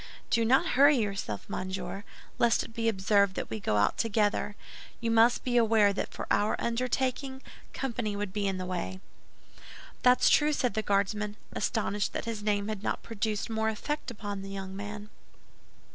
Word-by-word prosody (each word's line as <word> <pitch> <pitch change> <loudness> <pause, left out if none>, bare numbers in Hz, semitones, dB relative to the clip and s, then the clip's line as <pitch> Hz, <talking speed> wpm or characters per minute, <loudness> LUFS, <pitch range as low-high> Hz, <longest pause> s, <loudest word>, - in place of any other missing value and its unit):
"Do 230 - +3
not 255 +4 +3
hurry 285 +2 +6
yourself, 200 - -3
monsieur, 185 +1 -4 0.4
lest 235 -1 +3
it - - -11
be 230 -1 +1
observed 200 -1 +2
that - - -4
we 220 - -3
go 105 - 0
out 105 - +2
together. 210 -2 +1 0.4
You 230 -1 -1
must 230 +1 +4
be 245 -1 +1
aware 220 -3 +4
that - - -3
for - - -6
our 205 +1 +2
undertaking, 255 +3 -1 0.3
company 235 -5 -3
would 200 -2 -4
be 205 -1 0
in 190 -1 -1
the 185 - -4
way." 135 - -4 1.0
"That's 250 0 +5
true," 300 0 +4
said 250 -6 0
the 220 - 0
Guardsman, 205 +1 0 0.2
astonished 210 -3 -1
that - - -3
his 225 -2 -4
name 205 -1 0
had 215 -2 -4
not - - -2
produced 215 -2 -2
more 220 -1 0
effect 295 +7 -3
upon 205 -4 -5
the 195 - -7
young 190 -1 -6
man. 205 +1 -7
210 Hz, 175 wpm, -29 LUFS, 200-230 Hz, 1.0 s, hurry